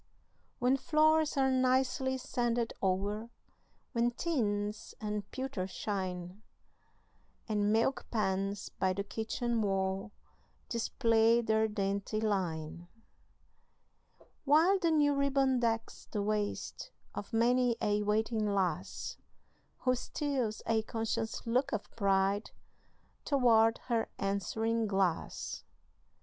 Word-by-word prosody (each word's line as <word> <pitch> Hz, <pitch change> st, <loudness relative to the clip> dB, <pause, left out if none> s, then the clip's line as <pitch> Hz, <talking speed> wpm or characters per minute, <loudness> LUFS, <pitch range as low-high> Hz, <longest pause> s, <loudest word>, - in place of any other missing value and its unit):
When 255 Hz, +2 st, +3 dB
floors 310 Hz, +1 st, +3 dB
are 265 Hz, -1 st, +3 dB
nicely 260 Hz, +1 st, +2 dB
sanded 240 Hz, -2 st, -1 dB
o'er, 200 Hz, +4 st, -1 dB, 0.6 s
When 235 Hz, -1 st, +2 dB
tins 210 Hz, -7 st, -2 dB
and 210 Hz, -2 st, -4 dB
pewter 260 Hz, -8 st, -3 dB
shine, 185 Hz, -1 st, -4 dB, 1.1 s
And 210 Hz, -2 st, +1 dB
milk 230 Hz, +5 st, +1 dB
pans 195 Hz, -2 st, -1 dB
by 185 Hz, 0 st, 0 dB
the 200 Hz, +2 st, -2 dB
kitchen 225 Hz, +2 st, -2 dB
wall 195 Hz, 0 st, -1 dB, 0.6 s
Display 230 Hz, -1 st, +3 dB
their 220 Hz, -1 st, +2 dB
dainty 200 Hz, 0 st, -2 dB
line; 175 Hz, -6 st, -2 dB, 1.6 s
While 325 Hz, +7 st, +5 dB
the 340 Hz, -3 st, +2 dB
new 295 Hz, -2 st, +4 dB
ribbon 275 Hz, -2 st, +2 dB
decks 230 Hz, -1 st, -2 dB
the 205 Hz, -2 st, -2 dB
waist 210 Hz, 0 st, -2 dB, 0.2 s
Of 205 Hz, -, -6 dB
many 240 Hz, +1 st, +3 dB
a 210 Hz, 0 st, +1 dB
waiting 215 Hz, +1 st, +1 dB
lass, 195 Hz, -3 st, -2 dB, 0.6 s
Who 255 Hz, -, +3 dB
steals 255 Hz, -4 st, -2 dB
a 225 Hz, -1 st, +2 dB
conscious 225 Hz, +1 st, -3 dB
look 255 Hz, +4 st, +1 dB
of 215 Hz, -3 st, -4 dB
pride 195 Hz, 0 st, +1 dB, 0.7 s
Toward 230 Hz, -5 st, +4 dB
her 230 Hz, -2 st, 0 dB
answering 220 Hz, +3 st, 0 dB
glass. 195 Hz, -4 st, -1 dB
225 Hz, 105 wpm, -32 LUFS, 200-255 Hz, 1.6 s, While